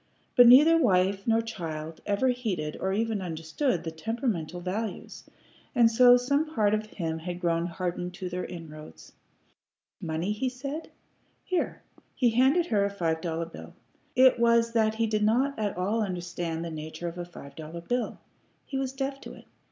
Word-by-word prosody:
But 245 -1 +8
neither 300 +7 +8
wife 195 - +2
nor 225 0 +3
child 165 -7 -6
ever 205 +6 +2
heeded 210 -12 -2
or 190 - -1
even 220 0 -1
understood 170 - -2
the 165 - -4
temperamental 180 - -3
values, 190 +3 -5 0.5
and 235 -2 +5
so 245 +1 +7
some 280 +5 +1
part 210 -2 +3
of 215 0 -1
him 165 -6 -4
had 175 +2 -5
grown 170 -1 0
hardened 180 0 -4
to 185 0 -5
their 180 0 -4
inroads. 155 -3 -10 0.9
"Money?" 165 +2 -2
he 230 +5 -1
said. 275 +5 -6 0.5
"Here." 365 -2 -2 0.3
He 245 -3 +3
handed 265 +9 +4
her 210 -10 +1
a 200 - +1
five 165 -5 -1
dollar 165 -1 -2
bill. 165 - -11 0.4
It 255 -1 +6
was 235 0 +4
that 220 -1 +2
he 225 0 +1
did 215 -1 0
not 245 +5 +2
at 205 -4 -2
all 205 +5 0
understand 175 -3 -3
the 165 - -5
nature 155 +2 -6
of 170 +1 -6
a - - -2
five 140 -5 -12
dollar 160 +2 -8
bill. 245 +8 -2 0.5
He 270 - -3
was 265 -1 -2
deaf 270 +1 -3
to - - -9
it. - - -14
200 Hz, 175 wpm, -28 LUFS, 170-245 Hz, 0.9 s, But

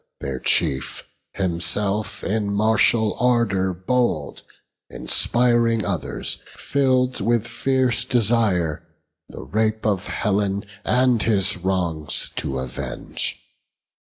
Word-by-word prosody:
Their 65 -2 -4
chief, 65 +1 0 0.3
himself 95 +3 -2
in 105 0 -1
martial 110 +1 +3
ardour 115 -6 +2
bold, 95 - -1 0.5
Inspiring 120 -2 +2
others, - - -3
fill'd 130 -3 +1
with 115 +1 +1
fierce 130 0 +1
desire 105 - +1 0.5
The - - -9
rape 110 0 -1
of 100 -3 0
Helen 100 -1 -1 0.2
and 125 -2 +3
his 100 -4 +2
wrongs 90 -5 -1
to 65 - -2
avenge. 65 -1 -4
105 Hz, 95 wpm, -22 LUFS, 95-120 Hz, 0.5 s, martial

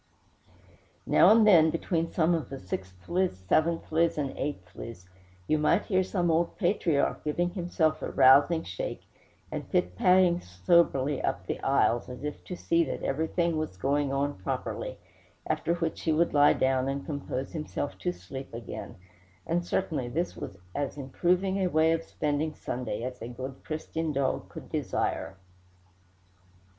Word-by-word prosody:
Now - - +6
and 220 0 +6
then, 165 -6 +7
between 165 0 -1
some 170 0 +2
of 165 -2 -2
the 135 - -6
sixthlies, 95 - -3
seventhlies, 165 - +2
and 140 -3 -1
eighthlies, 95 -6 -6 0.4
you 155 +7 +1
might 170 +6 +2
hear 185 -2 +2
some 180 -2 0
old 165 +1 +1
patriarch 175 -6 +1
giving 175 +4 0
himself 170 -3 0
a - - -3
rousing 145 +5 +5
shake, 90 - -5 0.5
and - - -5
pitpatting 175 - +3
soberly 135 - +2
up - - -2
the - - -3
aisles, 120 +2 +2
as 125 +2 -8
if 150 -1 -5
to 180 - -5
see 170 0 +2
that 130 - -5
everything 160 +3 0
was 155 -12 -3
going 140 +6 0
on 140 -4 -1
properly, 95 - -4 0.5
after 170 - 0
which 165 -2 -3
he 160 - +1
would 165 +2 +2
lie 145 0 +6
down 130 0 +1
and 140 0 -3
compose 140 -3 -4
himself 150 - -4
to 90 - -1
sleep 90 +10 -9
again; 115 - -7 0.5
and 175 +1 0
certainly 155 -9 -1
this 165 +9 -2
was 95 - -7 0.2
as 145 0 -3
improving 180 +8 0
a 190 - +2
way 160 -1 +3
of 165 0 +1
spending 150 0 -2
Sunday 120 -3 -4
as 125 0 -5
a 115 - -5
good 130 +2 -7
Christian 160 0 -3
dog 140 -2 -1
could - - -10
desire. 95 - -2
150 Hz, 150 wpm, -28 LUFS, 130-170 Hz, 0.5 s, then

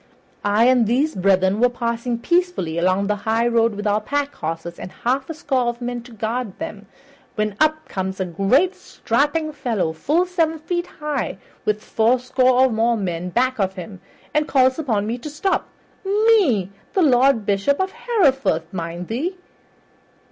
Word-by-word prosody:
I 205 +3 +3
and 250 -3 +4
these 275 +7 +1
brethren 190 +1 +2
were 245 +1 +4
passing 235 0 -2
peacefully 340 - 0
along 185 +3 +2
the 210 +1 0
highroad 230 +1 +1
with 205 +1 -5
our 210 +1 +2
pack 285 +5 -2
horses, 165 +2 -5
and - - -7
a - - -20
half 265 +4 0
score 260 -5 0
of 240 0 -2
men 245 0 -4
to 240 +1 -15
guard 225 -1 -3
them, 205 -1 -7 0.5
when 215 -2 -1
up 310 0 +2
comes 190 0 -4
a 190 - 0
great 200 - +2
strapping 295 +5 -1
fellow 225 - -1
full 305 - +1
seven 330 -3 0
feet 345 +3 -3
high, 300 -8 -4 0.3
with 210 0 0
fourscore 255 +3 +2
or 260 -1 +4
more 230 +1 +2
men 180 -3 -3
back 255 +5 0
of 190 -1 0
him, 185 +1 -9 0.3
and 300 0 +1
calls 260 +1 +3
upon 220 -9 0
me 235 +3 -3
to 300 - -7
stop 300 +6 -1 0.3
me, 390 - +3 0.2
the 380 - +3
Lord 255 -5 +4
Bishop 200 +8 +1
of 380 0 0
Hereford, 275 - +1
mark 170 0 -4
thou! 240 - -2
240 Hz, 165 wpm, -21 LUFS, 200-285 Hz, 0.5 s, and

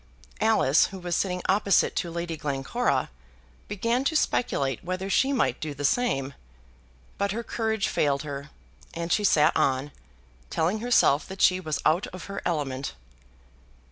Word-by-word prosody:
Alice, 215 -10 +4
who 195 - -9
was 175 -2 -3
sitting 180 0 -1
opposite 200 0 +3
to 170 - -1
Lady 170 0 -4
Glencora, 140 - -1 0.6
began 230 +5 0
to 315 - +1
speculate 140 - 0
whether 185 +2 -3
she 265 +7 +3
might 275 - +1
do 150 -2 -5
the 145 +1 -3
same; 140 - +1 0.9
but 200 0 0
her 235 +2 -3
courage 220 -3 -1
failed 140 -1 0
her, 140 -1 -6 0.5
and 170 0 -1
she 210 - +1
sat 155 -6 +4
on, 135 +2 +1 0.6
telling 175 +7 0
herself 220 - +3
that 190 0 -9
she 185 0 +4
was 155 -5 -2
out 170 +5 +2
of 185 -1 -9
her 200 - -6
element. 140 - -2
175 Hz, 150 wpm, -26 LUFS, 145-205 Hz, 0.9 s, Alice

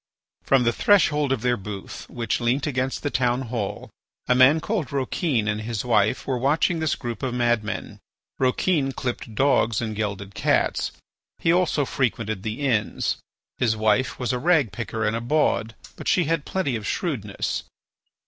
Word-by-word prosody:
From 135 -2 +3
the 120 0 +2
threshold 150 -8 +3
of 130 -4 0
their 125 -1 +2
booth, 100 0 -8
which 115 -2 -2
leant 125 +4 +1
against 130 -2 -2
the 145 - -1
town 125 0 +1
hall, 115 -5 -4 0.4
a 125 - +4
man 130 +5 +6
called 180 - -2
Rouquin 135 - 0
and 105 0 -1
his 115 0 -3
wife 110 -1 +2
were 130 -2 -1
watching 155 +6 +2
this 160 -2 +1
group 120 -3 -5
of 130 -3 -2
madmen. 120 -3 -1 0.4
Rouquin 135 +2 +1
clipped 120 -4 -4
dogs 115 -4 +3
and 110 -2 -3
gelded 100 -2 -3
cats; - - +1 0.5
he 165 - +2
also 175 -5 +2
frequented 115 -6 -1
the 110 +6 -4
inns. 115 -7 0 0.4
His 110 -2 +2
wife 110 +4 +1
was 125 -1 -1
a 125 - -1
ragpicker 120 - +1
and 105 +1 +1
a 115 - -2
bawd, 120 -4 +1 0.2
but - - -8
she 180 - +4
had 160 -1 -1
plenty 185 -10 -1
of 110 -2 -4
shrewdness. 110 - -2
125 Hz, 165 wpm, -24 LUFS, 110-140 Hz, 0.5 s, man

